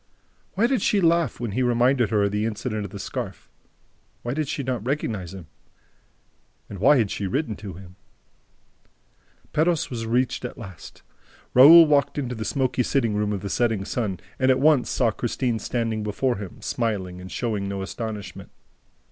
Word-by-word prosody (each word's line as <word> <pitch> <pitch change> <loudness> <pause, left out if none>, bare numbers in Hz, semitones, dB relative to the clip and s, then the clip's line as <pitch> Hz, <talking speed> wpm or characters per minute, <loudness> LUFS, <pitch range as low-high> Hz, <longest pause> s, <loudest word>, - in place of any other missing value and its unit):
Why 210 +5 +3
did 255 0 +1
she 205 - +2
laugh 170 -5 +2
when 120 -3 -3
he 125 - -1
reminded 120 -1 +2
her 105 -2 +2
of 100 - +1
the 105 +2 0
incident 110 -1 -3
of - - -7
the - - -8
scarf? - - -6 0.7
Why 120 - -2
did 155 0 -2
she 140 - -3
not 125 -4 -2
recognize 110 - -2
him? 95 -4 -9 1.2
And 100 - -8
why 135 +8 +5
had 110 -5 +1
she 100 - -3
written 125 +2 -2
to 100 -3 -8
him?... 90 +1 -13 1.6
Perros 160 0 +1
was 115 -2 -4
reached 125 +3 0
at 125 - -6
last. 95 -9 -11 0.5
Raoul 160 +6 +10
walked 145 -2 +2
into 130 -4 -2
the 110 -2 -5
smoky 130 0 0
sitting 120 -3 +1
room 105 0 0
of 100 -3 -3
the 100 - -5
Setting 115 -5 0
Sun 105 -7 -2 0.2
and 130 0 +3
at 130 - +4
once 145 -2 +4
saw 120 -3 +1
Christine 120 +1 -2
standing 115 -2 -2
before 105 +4 -1
him, 100 -3 -9
smiling 95 -6 -2
and 95 - -10
showing 105 -5 -2
no 100 -1 -3
astonishment. 105 0 -6
115 Hz, 175 wpm, -24 LUFS, 105-130 Hz, 1.6 s, Raoul